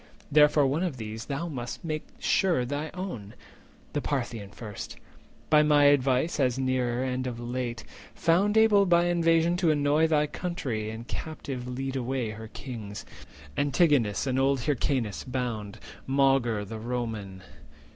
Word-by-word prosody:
Therefore 150 0 +5
one 140 +5 +1
of 175 -8 -2
these 110 0 -6
Thou 145 +4 -3
must 125 +1 -6
make 155 -1 -3
sure 175 -10 +2
thy 145 +4 -3
own: 125 - -6 0.6
the 145 - 0
Parthian 120 -8 -3
first, 105 0 -8 0.6
By 150 -1 +7
my 150 -1 +4
advice, 140 +2 +3
as 130 -3 +2
nearer, 130 -2 0
and 130 0 -2
of 120 -2 -5
late 120 -1 -4 0.3
Found 195 +6 +2
able 210 -3 +5
by 175 0 +4
invasion 170 0 +3
to 175 -3 +2
annoy 150 +1 +3
Thy 150 -2 +3
country, 140 - -3
and 115 +2 -7
captive 135 -5 -5
lead 135 +2 -4
away 125 -3 -2
her 110 +1 -8
kings, 110 -4 -7 0.5
Antigonus 145 - +2
and 130 -1 0
old 135 -1 +2
Hyrcanus, 130 -6 -1
bound, 115 -5 -4 0.3
Maugre 135 -6 +2
the 110 +2 -7
Roman. 110 -5 -4
130 Hz, 145 wpm, -28 LUFS, 120-150 Hz, 0.6 s, By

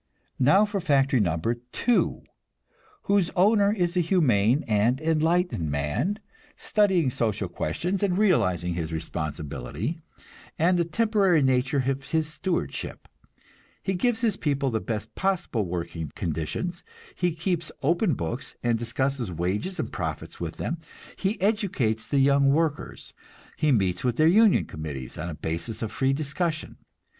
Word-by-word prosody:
Now 190 +11 +5
for 205 -1 -2
factory 140 -5 +3
number 85 +3 +1 0.2
two, 245 -1 +1 0.8
whose 200 -3 +2
owner 200 +2 +4
is 180 -4 0
a - - +3
humane 145 - +3
and 115 +4 +2
enlightened 160 - +1
man, 75 - -1 0.4
studying 190 -10 +2
social 110 -5 -1
questions 175 - -2
and 190 -3 +1
realizing 90 - +2
his 85 -2 -3
responsibility, 80 - -4 0.6
and 175 +3 +3
the 170 - +2
temporary 195 -5 +3
nature 130 +1 +2
of 135 0 -2
his 160 -1 +1
stewardship. 155 - -3 0.8
He 190 - 0
gives 225 +5 0
his 220 -4 +1
people 140 -3 0
the 110 - 0
best 110 -1 -4
possible 175 - -1
working 85 -3 -4
conditions, 85 - -3 0.3
he 180 -2 0
keeps 170 -1 -2
open 170 - +2
books 115 +10 -5
and 120 -2 +1
discusses 120 -1 -1
wages 95 - -2
and - - -2
profits - - -5
with - - -5
them, - - -3 0.4
he 200 +2 -1
educates 185 - 0
the 140 - 0
young 140 0 +4
workers, 155 0 -1 0.4
he 155 -1 +2
meets 95 -7 +1
with 125 -2 +1
their 155 - +3
union 210 +4 +5
committees 75 -5 -7
on 85 - -3
a 80 - -5
basis 85 +10 -4
of 110 - -3
free 135 +3 +1
discussion. 155 +3 -2
140 Hz, 140 wpm, -26 LUFS, -, 0.8 s, Now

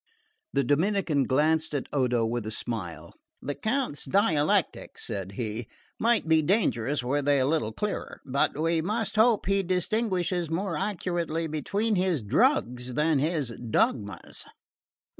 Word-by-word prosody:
The 140 - +1
Dominican 155 0 +1
glanced 155 +4 +1
at 140 - -1
Odo 125 -4 +2
with 115 -1 -2
a - - -2
smile. 110 -6 -5 0.3
"The 145 - -4
Count's 220 - -1
dialectics," 155 -2 +1
said 100 -1 -4
he, 110 +1 -4 0.3
"might 230 -5 +2
be 160 -1 +5
dangerous 145 - +1
were 140 +4 0
they 145 0 +3
a 130 - +2
little 135 -7 0
clearer; 210 - -4
but 140 +1 +1
we 165 +1 +2
must 215 +6 -2
hope 220 0 +4
he 195 +1 +2
distinguishes 180 -2 0
more 175 +2 -1
accurately 175 -3 -2
between 200 +8 -1
his 180 - +1
drugs 125 - +1
than 150 -1 +2
his 150 -3 0 0.2
dogmas." 105 -2 -1
155 Hz, 140 wpm, -27 LUFS, 130-190 Hz, 0.3 s, be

